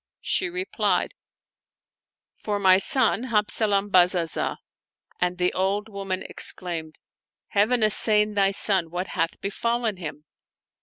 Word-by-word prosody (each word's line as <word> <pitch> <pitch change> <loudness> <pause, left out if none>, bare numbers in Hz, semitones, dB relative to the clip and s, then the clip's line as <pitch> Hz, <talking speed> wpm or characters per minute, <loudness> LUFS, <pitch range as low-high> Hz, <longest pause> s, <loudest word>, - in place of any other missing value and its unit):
She 375 - -1
replied, 365 +2 -1 0.7
" - - -69
For 210 -1 -2
my 190 -2 +5
son 250 +2 +2
Hab 215 -4 0
zalam 205 -2 0
Bazazah 175 -2 +2 0.3
"; - - -36
and 180 0 0
the 180 0 0
old 200 +3 -1
woman 195 -2 -5
exclaimed, 165 -3 0 0.3
'' - - -69
Heaven 220 +3 +2
assain 210 0 +3
thy 200 -1 +2
son! 195 -3 +2
what 180 +3 -5
hath 165 -2 -2
befallen 230 +1 -2
him?" 150 -3 -8
200 Hz, 135 wpm, -24 LUFS, 180-215 Hz, 0.7 s, my